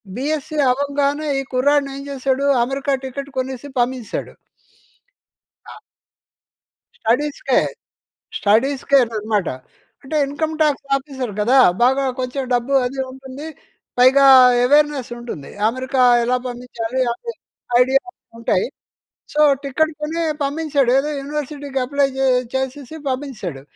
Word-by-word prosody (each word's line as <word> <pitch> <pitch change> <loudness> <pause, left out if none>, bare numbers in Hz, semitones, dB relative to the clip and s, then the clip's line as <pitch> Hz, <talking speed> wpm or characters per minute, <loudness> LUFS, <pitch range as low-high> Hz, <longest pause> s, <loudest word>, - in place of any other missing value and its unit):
BSc 305 +3 -3
అవ్వంగానే 285 +2 -1
ఈ - - -6
కుర్రాడిని 280 +2 +2
ఏం 275 - -7
చేశాడు 270 0 -1 0.2
అమెరికా 275 +3 -2
టికెట్ 275 +2 -6
కొనేసి 260 +1 -4
పంపించేశాడు. 245 -2 -3 1.3
అ - - -11 1.3
స్టడీస్‌కే, 280 +6 +1 0.8
స్టడీస్‌కే 265 +6 +2
అనమాట. 215 -4 -2 0.5
అంటే 290 +3 -4
ఇన్కమ్ 310 +3 -3
టాక్స్ 285 -2 0
ఆఫీసర్ 265 -4 -5
కదా 245 +6 +4 0.2
బాగా 265 +3 +3 0.2
కొంచెం 255 +2 -3
డబ్బు 245 +3 -1
అది 270 +2 -6
ఉంటుంది, 265 +3 -9 0.5
పైగా 265 +2 +6 0.4
అవేర్‌నెస్ 290 -2 +2
ఉంటుంది. 230 - -8 0.2
అమెరికా 260 +2 -1 0.2
ఎలా 250 +1 +1
పంపించాలి 245 0 -4
అనే 465 - -7 0.5
ఐడియాలు 275 +8 +2 0.3
ఉంటాయి. 210 -5 0 0.7
సో, 300 - +2 0.2
టికెట్ 310 +4 0
కొని 320 +3 -2 0.2
పంపించాడు. 285 -2 0
ఏదో 295 +2 -2
యూనివర్సిటీకి 285 -1 -4
అప్లై 280 +1 +1 0.5
చేసేసి 265 +2 -4
పంపించేసాడు. 235 - -5
270 Hz, 105 wpm, -20 LUFS, 250-285 Hz, 1.3 s, పైగా